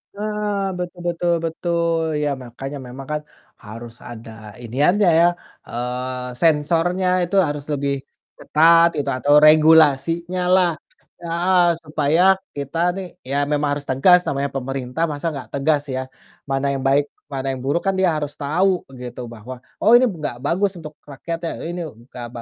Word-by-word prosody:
Heeh, 210 Hz, 0 st, -2 dB, 0.3 s
betul 175 Hz, 0 st, -5 dB
betul 175 Hz, 0 st, 0 dB
betul, 170 Hz, 0 st, -1 dB, 0.2 s
ya 145 Hz, -, +1 dB
makanya 135 Hz, +4 st, -7 dB
memang 135 Hz, +2 st, -9 dB
kan 150 Hz, -, -2 dB, 0.4 s
harus 115 Hz, +2 st, -9 dB, 0.2 s
ada 115 Hz, -1 st, -10 dB, 0.3 s
iniannya 150 Hz, -, +2 dB
ya, 170 Hz, -, +6 dB, 0.4 s
eee, 125 Hz, +1 st, -4 dB
sensornya 165 Hz, +4 st, +2 dB, 0.2 s
itu 175 Hz, +3 st, -3 dB
harus 145 Hz, -1 st, -4 dB
lebih 140 Hz, 0 st, -1 dB, 0.4 s
ketat 165 Hz, +2 st, +5 dB
gitu, 140 Hz, -1 st, -1 dB
atau 145 Hz, +3 st, +2 dB
regulasinyalah 165 Hz, +4 st, +4 dB, 0.5 s
heeh, 175 Hz, +2 st, +1 dB, 0.2 s
supaya 150 Hz, +1 st, +1 dB, 0.3 s
kita 140 Hz, +2 st, -5 dB, 0.2 s
nih 195 Hz, -, -5 dB, 0.2 s
ya 140 Hz, -, 0 dB
memang 145 Hz, 0 st, +1 dB
harus 145 Hz, 0 st, -5 dB
tegas 160 Hz, +8 st, +5 dB
namanya 140 Hz, 0 st, -1 dB
pemerintah 135 Hz, +2 st, -3 dB
masa 145 Hz, +2 st, -6 dB
nggak 140 Hz, -3 st, -8 dB
tegas 145 Hz, +1 st, +1 dB
ya. 130 Hz, -, -1 dB, 0.5 s
Mana 135 Hz, +1 st, 0 dB
yang 135 Hz, -, -3 dB
baik, 140 Hz, +2 st, +4 dB, 0.3 s
mana 135 Hz, 0 st, -3 dB
yang 130 Hz, -, -5 dB
buruk, 145 Hz, +5 st, +1 dB
kan 195 Hz, -, +2 dB
dia 190 Hz, -1 st, +3 dB
harus 145 Hz, -1 st, -3 dB
tahu 180 Hz, +6 st, +1 dB, 0.2 s
gitu 125 Hz, 0 st, -7 dB
bahwa, 115 Hz, +3 st, -9 dB, 0.3 s
"Oh 220 Hz, -, +4 dB
ini 255 Hz, -, +4 dB
nggak 155 Hz, -, -5 dB
bagus 190 Hz, +5 st, +1 dB
untuk 155 Hz, -1 st, -9 dB, 0.2 s
rakyatnya, 165 Hz, +4 st, -5 dB, 0.2 s
ini 175 Hz, +1 st, -5 dB
nggak 120 Hz, 0 st, -11 dB
ba 120 Hz, -, -6 dB
150 Hz, 150 wpm, -21 LUFS, 135-170 Hz, 0.5 s, ya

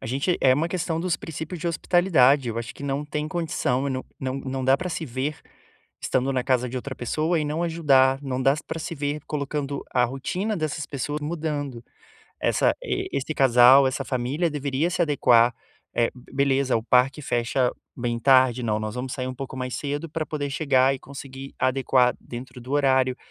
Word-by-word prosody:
A -, -, -7 dB
gente 140 Hz, +9 st, 0 dB
é 130 Hz, -, +5 dB
uma 155 Hz, +6 st, +1 dB
questão 170 Hz, -2 st, -2 dB
dos 175 Hz, -1 st, 0 dB
princípios 160 Hz, +2 st, -7 dB
de 170 Hz, -, -1 dB
hospitalidade, 150 Hz, -7 st, +3 dB
eu 115 Hz, -, -3 dB
acho 115 Hz, +1 st, -6 dB
que -, -, -11 dB
não 140 Hz, +1 st, -2 dB
tem 150 Hz, +1 st, -3 dB
condição 145 Hz, -5 st, -1 dB
não 130 Hz, -1 st, -3 dB
não 130 Hz, 0 st, -3 dB
não 130 Hz, -1 st, -4 dB
dá 135 Hz, +1 st, +5 dB
pra 180 Hz, -, -4 dB
se 165 Hz, -2 st, -3 dB
ver 130 Hz, +5 st, -3 dB, 0.6 s
estando 130 Hz, +1 st, 0 dB
na 130 Hz, -1 st, 0 dB
casa 125 Hz, -1 st, +1 dB
de 125 Hz, -, -8 dB
outra 130 Hz, +2 st, -5 dB
pessoa 155 Hz, +7 st, 0 dB
e -, -, -1 dB
não 150 Hz, +3 st, -2 dB
ajudar, 135 Hz, -6 st, +3 dB
não 130 Hz, -2 st, -2 dB
dá 135 Hz, +2 st, +4 dB
pra 165 Hz, -, -4 dB
se 165 Hz, -, -5 dB
ver 145 Hz, 0 st, -2 dB
colocando 140 Hz, -1 st, -3 dB
a 125 Hz, -1 st, +3 dB
rotina 180 Hz, -, -2 dB
dessas 155 Hz, -1 st, -3 dB
pessoas 145 Hz, +2 st, -4 dB
mudando. 150 Hz, -6 st, -4 dB, 0.6 s
Essa -, -, +2 dB
esse 140 Hz, +3 st, -2 dB
casal, 130 Hz, +1 st, +7 dB
essa 130 Hz, +1 st, -2 dB
família 135 Hz, +7 st, -1 dB
deveria 145 Hz, +3 st, -1 dB
se 180 Hz, -, -3 dB
adequar, 125 Hz, -6 st, +4 dB, 0.4 s
eh, 120 Hz, -, +2 dB
beleza, 135 Hz, 0 st, 0 dB
o 110 Hz, -, -2 dB
parque 130 Hz, +5 st, +2 dB
fecha 120 Hz, 0 st, +1 dB, 0.3 s
bem 120 Hz, -1 st, -2 dB
tarde 130 Hz, -1 st, +4 dB
não, 110 Hz, -2 st, 0 dB
nós 110 Hz, 0 st, -4 dB
vamos 125 Hz, +1 st, -4 dB
sair 130 Hz, -1 st, -3 dB
um 130 Hz, -, -5 dB
pouco 130 Hz, 0 st, -7 dB
mais 125 Hz, -1 st, -4 dB
cedo 145 Hz, +3 st, -3 dB
pra 160 Hz, 0 st, -3 dB
poder 145 Hz, -2 st, -3 dB
chegar 135 Hz, -2 st, +3 dB
e 135 Hz, -, -6 dB
conseguir 135 Hz, 0 st, -9 dB
adequar 130 Hz, -1 st, +2 dB
dentro 125 Hz, +1 st, -9 dB
do 125 Hz, +3 st, -8 dB
horário, 130 Hz, -3 st, +3 dB
135 Hz, 190 wpm, -24 LUFS, 130-150 Hz, 0.6 s, casal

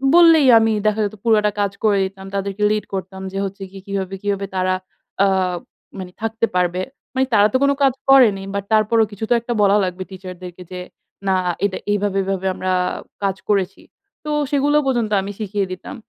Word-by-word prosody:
বললেই, 330 Hz, -5 st, +7 dB
আমি 225 Hz, 0 st, +2 dB
দেখা 215 Hz, +1 st, +1 dB
যেত 205 Hz, -, -5 dB
পুরোটা 215 Hz, -2 st, +3 dB
কাজ 200 Hz, -1 st, 0 dB
করে 210 Hz, -2 st, +3 dB
দিতাম। 190 Hz, 0 st, -8 dB
তাদেরকে 200 Hz, +1 st, -2 dB
লিড 215 Hz, 0 st, -1 dB
করতাম 190 Hz, 0 st, -5 dB
যে, -, -, -4 dB
হচ্ছে 195 Hz, 0 st, -7 dB
কি, 195 Hz, -, -11 dB
কিভাবে, 195 Hz, -1 st, -3 dB
কিভাবে 200 Hz, -1 st, -1 dB
তারা 185 Hz, 0 st, +1 dB, 0.5 s
আ -, -, +4 dB, 0.7 s
মানে 185 Hz, -1 st, -7 dB
থাকতে 225 Hz, +1 st, 0 dB
পারবে। 180 Hz, 0 st, +1 dB, 0.3 s
মানে 265 Hz, -, +2 dB
তারা 205 Hz, -1 st, +6 dB
তো -, -, +4 dB
কোন 280 Hz, -, +4 dB
কাজ 270 Hz, -2 st, +4 dB, 0.2 s
করেনি, 225 Hz, -8 st, +6 dB
বাট 200 Hz, -, -2 dB
তারপরও 220 Hz, +1 st, +4 dB
কিছু 205 Hz, +2 st, -8 dB
তো -, -, +5 dB
একটা 235 Hz, +1 st, -4 dB
বলা 200 Hz, +1 st, +5 dB
লাগবে, 185 Hz, 0 st, -3 dB
টিচারদেরকে 180 Hz, -1 st, -9 dB
যে 180 Hz, -, -5 dB, 0.5 s
না, 190 Hz, -, +3 dB, 0.3 s
"এটা 190 Hz, -, -1 dB, 0.2 s
এভাবে, 205 Hz, -1 st, 0 dB
এভাবে 190 Hz, -1 st, -2 dB
আমরা 185 Hz, 0 st, -2 dB, 0.5 s
কাজ 195 Hz, -1 st, +1 dB
করেছি।" 195 Hz, -3 st, 0 dB, 0.4 s
তো 300 Hz, -, -5 dB, 0.2 s
সেগুলো 290 Hz, +1 st, +2 dB
পর্যন্ত 235 Hz, -5 st, 0 dB
আমি 200 Hz, +1 st, -5 dB
শিখিয়ে 205 Hz, -1 st, -1 dB
দিতাম। 185 Hz, -, -7 dB
200 Hz, 185 wpm, -20 LUFS, 190-220 Hz, 0.7 s, বললেই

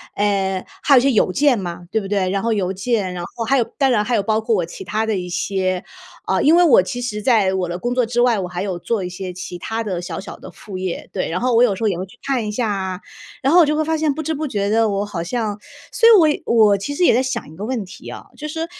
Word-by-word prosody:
呃， 195 Hz, -2 st, 0 dB, 0.2 s
还 280 Hz, -, +5 dB
有 -, -, +8 dB
一 -, -, +1 dB
些 275 Hz, +2 st, +3 dB
邮 210 Hz, -5 st, +2 dB
件 280 Hz, +4 st, +3 dB
嘛， 175 Hz, -2 st, -6 dB
对 220 Hz, -, +1 dB
不 195 Hz, -, -6 dB
对。 195 Hz, -2 st, 0 dB
然 195 Hz, +1 st, -1 dB
后 230 Hz, 0 st, +1 dB
邮 190 Hz, -3 st, -1 dB
件， 195 Hz, 0 st, -1 dB
然 180 Hz, -1 st, -5 dB
后 230 Hz, -, -6 dB
还 275 Hz, +5 st, +2 dB
有 245 Hz, -, +3 dB
当 270 Hz, -2 st, +3 dB
然 210 Hz, -3 st, +2 dB
还 240 Hz, -, 0 dB
有 -, -, +2 dB
包 215 Hz, +2 st, +1 dB
括 225 Hz, 0 st, 0 dB
我 180 Hz, -, +1 dB
其 170 Hz, -, -9 dB
他 210 Hz, +4 st, -1 dB
的 220 Hz, -2 st, -1 dB
一 180 Hz, -1 st, -4 dB
些 185 Hz, 0 st, -1 dB, 0.4 s
呃， -, -, +1 dB
因 310 Hz, +3 st, +6 dB
为 350 Hz, -, +6 dB
我 305 Hz, -, +6 dB
其 245 Hz, +7 st, -5 dB
实 215 Hz, -4 st, -3 dB
在 215 Hz, -6 st, +3 dB
我 185 Hz, -1 st, -1 dB
的 175 Hz, +1 st, -4 dB
工 240 Hz, +5 st, -2 dB
作 250 Hz, -1 st, +2 dB
之 240 Hz, +1 st, 0 dB
外， 240 Hz, -3 st, +3 dB
我 185 Hz, -, -3 dB
还 180 Hz, 0 st, -5 dB
有 190 Hz, -3 st, -3 dB
做 220 Hz, +1 st, -2 dB
一 180 Hz, -, -4 dB
些 180 Hz, 0 st, -6 dB
其 180 Hz, 0 st, -7 dB
他 225 Hz, +6 st, -3 dB
的 190 Hz, -5 st, -3 dB
小 180 Hz, -, -5 dB
小 195 Hz, -, -9 dB
的 -, -, -11 dB
副 195 Hz, -3 st, -9 dB
业， 185 Hz, -2 st, -4 dB
对。 -, -, -2 dB
然 175 Hz, -, -2 dB
后 250 Hz, -1 st, +1 dB
我 235 Hz, -, +6 dB
有 215 Hz, -5 st, +3 dB
时 210 Hz, -, -6 dB
候 -, -, +3 dB
也 190 Hz, -4 st, 0 dB
会 185 Hz, -, -4 dB
去 195 Hz, +6 st, -19 dB
看 260 Hz, -5 st, -1 dB
一 -, -, -2 dB
下 225 Hz, +1 st, -1 dB
啊。 190 Hz, -2 st, -3 dB, 0.4 s
然 270 Hz, -, +2 dB
后 350 Hz, -, +7 dB
我 340 Hz, -, +7 dB
就 300 Hz, +1 st, 0 dB
会 310 Hz, -, +1 dB
发 320 Hz, +1 st, 0 dB
现 310 Hz, -2 st, +1 dB
不 315 Hz, -, -4 dB
知 320 Hz, -, -2 dB
不 305 Hz, +1 st, -3 dB
觉 200 Hz, -5 st, -1 dB
地 225 Hz, +1 st, +3 dB
我 200 Hz, -1 st, -1 dB
好 175 Hz, -5 st, -4 dB
像 210 Hz, +2 st, -3 dB, 0.3 s
所 460 Hz, -, +4 dB
以 335 Hz, -10 st, +5 dB
我 -, -, 0 dB
我 210 Hz, -3 st, +5 dB
其 200 Hz, +9 st, -4 dB
实 360 Hz, -, 0 dB
也 -, -, +6 dB
在 250 Hz, -, +3 dB
想 255 Hz, -, -4 dB
一 -, -, -13 dB
个 200 Hz, +5 st, -6 dB
问 240 Hz, -2 st, -2 dB
题 185 Hz, -, -12 dB
啊， -, -, -8 dB
就 305 Hz, -, -6 dB
是 320 Hz, +2 st, -3 dB
215 Hz, 330 characters per minute, -20 LUFS, 190-250 Hz, 0.4 s, 有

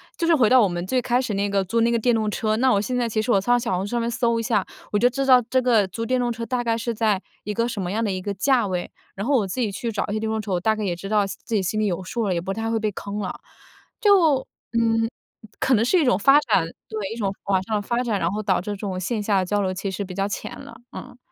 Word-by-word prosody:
就 335 Hz, -, -1 dB
是 330 Hz, -, +5 dB
回 250 Hz, -6 st, +4 dB
到 255 Hz, +2 st, +6 dB
我 205 Hz, -, +4 dB
们 175 Hz, 0 st, -3 dB
最 255 Hz, +5 st, 0 dB
开 245 Hz, 0 st, +1 dB
始 250 Hz, -5 st, -2 dB
那 200 Hz, +1 st, 0 dB
个 195 Hz, -1 st, +1 dB
租 230 Hz, +5 st, 0 dB
那 235 Hz, -, +3 dB
个 235 Hz, -, +2 dB
电 240 Hz, +1 st, +2 dB
动 215 Hz, -1 st, +1 dB
车， 215 Hz, +1 st, 0 dB
那 260 Hz, +1 st, +3 dB
我 200 Hz, -, +3 dB
现 250 Hz, +5 st, -2 dB
在 240 Hz, -2 st, 0 dB
其 215 Hz, -, -1 dB
实 240 Hz, -, -1 dB
我 195 Hz, -, +4 dB
上 245 Hz, +3 st, +3 dB
小 230 Hz, -6 st, -1 dB
红 190 Hz, +3 st, -2 dB
书 -, -, -8 dB
上 240 Hz, -1 st, 0 dB
面 230 Hz, -, -1 dB
搜 235 Hz, -1 st, +1 dB
一 -, -, -2 dB
下， 210 Hz, -4 st, +1 dB, 0.3 s
我 205 Hz, -, +2 dB
就 245 Hz, +2 st, +5 dB
知 270 Hz, +2 st, -2 dB
道 255 Hz, -2 st, +7 dB
这 260 Hz, -, +3 dB
个 225 Hz, -6 st, +3 dB
租 230 Hz, +5 st, -5 dB
电 255 Hz, +2 st, +1 dB
动 245 Hz, -1 st, 0 dB
车 230 Hz, 0 st, -4 dB
大 250 Hz, -1 st, -1 dB
概 230 Hz, -1 st, 0 dB
是 230 Hz, 0 st, -2 dB
在， 215 Hz, -3 st, +1 dB, 0.2 s
一 210 Hz, -, -4 dB
个 230 Hz, +1 st, +1 dB
什 225 Hz, -5 st, -4 dB
么 180 Hz, 0 st, -3 dB
样 225 Hz, +2 st, -1 dB
的 210 Hz, -, 0 dB
一 185 Hz, -1 st, -3 dB
个 205 Hz, -, -3 dB
价 240 Hz, 0 st, +2 dB
位？ 180 Hz, -1 st, -3 dB, 0.2 s
然 195 Hz, -, -4 dB
后 280 Hz, +2 st, +2 dB
我 210 Hz, -6 st, +2 dB
自 220 Hz, +7 st, -4 dB
己 220 Hz, -4 st, 0 dB
去 230 Hz, +3 st, -4 dB
找 205 Hz, -, -2 dB
一 205 Hz, -, -3 dB
些 215 Hz, -, -1 dB
电 220 Hz, 0 st, -2 dB
动 220 Hz, 0 st, -1 dB
车， 210 Hz, -2 st, -5 dB
我 175 Hz, -, +1 dB
大 220 Hz, +4 st, +1 dB
概 215 Hz, -, -4 dB
也 180 Hz, -3 st, -1 dB
知 195 Hz, +3 st, -8 dB
道， 210 Hz, -2 st, +3 dB
心 195 Hz, -, -7 dB
自 230 Hz, -, -3 dB
己 195 Hz, -, +1 dB
心 215 Hz, +4 st, -1 dB
里 215 Hz, -, +1 dB
有 185 Hz, 0 st, -2 dB
数 220 Hz, +3 st, -2 dB
了， 185 Hz, -, +1 dB
也 170 Hz, -, 0 dB
不 190 Hz, +3 st, -3 dB
太 225 Hz, +2 st, -3 dB
会 225 Hz, -, +1 dB
被 215 Hz, -1 st, -1 dB
坑 200 Hz, +1 st, -6 dB
了。 195 Hz, -3 st, -3 dB, 0.7 s
就， 340 Hz, -10 st, +4 dB, 0.3 s
嗯， 225 Hz, -1 st, +2 dB, 0.5 s
可 265 Hz, -, +2 dB
能 225 Hz, 0 st, +4 dB
是 310 Hz, +10 st, +3 dB
一 300 Hz, -, +2 dB
种 205 Hz, -6 st, +3 dB
发 275 Hz, +7 st, +6 dB
展， 220 Hz, -, +2 dB, 0.2 s
对， 210 Hz, -3 st, -4 dB
一 -, -, -7 dB
种 195 Hz, -3 st, -1 dB
网 190 Hz, -2 st, +1 dB
上 215 Hz, +2 st, -1 dB
的 -, -, -2 dB
发 235 Hz, +4 st, -1 dB
展， 220 Hz, -5 st, -1 dB
然 170 Hz, -, +1 dB
后 210 Hz, +3 st, -3 dB
导 190 Hz, -3 st, +1 dB
致 200 Hz, -, -7 dB
这 -, -, -3 dB
种 190 Hz, -3 st, -4 dB
线 210 Hz, +3 st, -2 dB
下 200 Hz, -3 st, +2 dB
交 205 Hz, +2 st, 0 dB
流 185 Hz, -1 st, -1 dB
其 195 Hz, +1 st, -4 dB
实 190 Hz, +1 st, -4 dB
比 185 Hz, -, -8 dB
较 195 Hz, +2 st, -1 dB
浅 200 Hz, -, -6 dB
了， 280 Hz, -, -11 dB, 0.2 s
嗯。 250 Hz, -1 st, -9 dB
220 Hz, 350 characters per minute, -23 LUFS, 195-240 Hz, 0.7 s, 道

